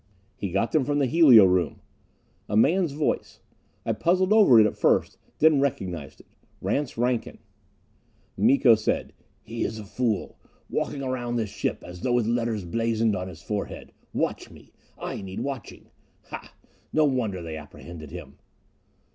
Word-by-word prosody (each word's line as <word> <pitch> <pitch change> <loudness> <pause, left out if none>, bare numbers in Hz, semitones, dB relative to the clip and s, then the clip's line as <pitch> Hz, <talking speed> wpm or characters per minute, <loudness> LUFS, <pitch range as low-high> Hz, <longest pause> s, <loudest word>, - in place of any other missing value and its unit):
"He 100 - -4
got 100 +5 0
them 155 - +3
from 145 +2 0
the 140 - +3
helio 130 - +7
room." 90 -1 +1 0.7
A 105 - +1
man's 170 - +3
voice; 150 +2 -2 0.5
I - - +1
puzzled 185 +3 +2
over 200 - +7
it 110 - +7
at 105 - -1
first, - - +1 0.2
then 155 -3 +5
recognized 90 - -3
it. - - -25 0.3
Rance 140 -3 -2
Rankin. 120 0 -1 1.0
Miko 135 -3 +5
said, 110 -1 -1 0.3
"He 115 +1 -4
is 110 - -3
a 110 - -7
fool. 110 +1 -2 0.3
Walking 140 - -2
around 120 -2 -2
this 110 -4 -2
ship - - -3
as 90 0 -10
though 125 - 0
with 120 -2 +2
letters 115 -4 -1
blazoned 115 +2 0
on 90 0 -4
his 85 -2 -11
forehead 105 -2 -5 0.2
'Watch - - -2
me - - -17 0.2
I - - -5
need 95 0 -6
watching 135 -7 -6 0.2
' - - -39
Hah! - - -8 0.4
No 155 0 +3
wonder 115 -10 -1
they 80 -1 -6
apprehended 75 +1 -10
him!" - - -10
115 Hz, 160 wpm, -26 LUFS, 100-140 Hz, 1.0 s, helio